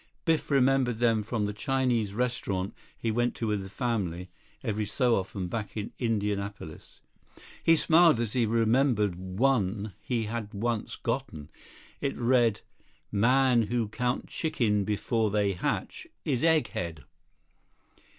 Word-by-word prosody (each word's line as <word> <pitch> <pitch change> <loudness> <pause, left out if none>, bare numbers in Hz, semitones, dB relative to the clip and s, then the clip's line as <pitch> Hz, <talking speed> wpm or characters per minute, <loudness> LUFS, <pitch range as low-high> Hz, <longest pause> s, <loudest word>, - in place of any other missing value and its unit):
Biff 165 -2 +1
remembered 135 -3 +3
them 115 -2 +2
from 105 0 -2
the 105 - -3
Chinese 120 -3 0
restaurant 105 -5 -1 0.2
he 115 - -1
went 120 +2 0
to 115 - -3
with 105 -2 0
the 95 - -8
family 95 -7 -2 0.3
every 105 -3 -1
so 120 +2 +2
often 95 -1 -3
back 105 +3 -5
in 105 - -4
Indianapolis. 100 -7 -3 0.6
He 165 - +6
smiled 165 -4 +5
as 115 -3 -2
he 120 -3 +2
remembered 115 -2 +2
one 100 +2 0
he 120 -3 -1
had 110 -1 -5
once 115 +1 -2
gotten. 115 - -4 0.5
It 140 - -1
had - - -12
read: 120 -3 +3 0.5
"Man 120 +2 +3
who 115 -2 -1
count 125 +3 -1
chickens 115 - 0
before 110 +1 0
they 100 -1 +1
hatch 90 - -3 0.2
is 130 -4 0
egghead." 90 - 0
115 Hz, 135 wpm, -28 LUFS, 100-125 Hz, 0.6 s, He